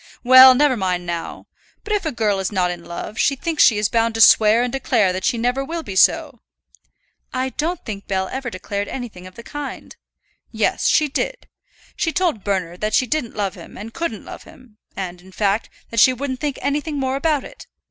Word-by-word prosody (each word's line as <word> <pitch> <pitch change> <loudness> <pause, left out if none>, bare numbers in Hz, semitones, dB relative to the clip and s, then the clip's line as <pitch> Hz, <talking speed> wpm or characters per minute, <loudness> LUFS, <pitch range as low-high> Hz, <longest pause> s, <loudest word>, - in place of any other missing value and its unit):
"Well, 260 +1 +9
never 285 0 +3
mind 180 -4 -2
now. 170 -1 -5 0.4
But 425 - -3
if 405 -5 -1
a - - -1
girl 215 -5 0
is 190 +1 -2
not 180 -3 +1
in 175 -1 -8
love, 175 +5 -7
she 275 - +2
thinks 320 +2 -1
she 220 - +5
is 210 0 +1
bound 230 +1 0
to 225 - 0
swear 220 +2 +6
and 245 - -3
declare 225 -8 +1
that 185 0 -4
she 240 - +1
never 245 +4 0
will 330 +3 -5
be 195 - -7
so." 280 - +3 0.9
"I 255 +1 -2
don't 320 +6 -3
think 200 -2 -7
Bell 190 -1 -1
ever 265 -1 -4
declared 200 0 -4
anything 225 -8 -7
of 185 - -15
the 235 - -11
kind." 290 +2 -7 0.6
"Yes, - - 0
she 305 - +3
did. - - -4 0.5
She 325 - -1
told 330 - -1
Bernard 180 -3 -2
that 215 0 0
she 255 - +3
didn't 250 -2 -3
love 200 -3 -2
him - - -12
and 225 +3 -9
couldn't 335 0 -4
love - - -9
him, 250 -7 -18 0.2
and, 180 -2 -5
in 190 +1 -16
fact, 205 +2 0 0.2
that 230 - 0
she 255 - +6
wouldn't 260 0 -4
think 290 -1 -3
anything 290 +2 -2
more 265 0 -1
about 295 0 0
it. - - -12
235 Hz, 210 wpm, -20 LUFS, 200-280 Hz, 0.9 s, Well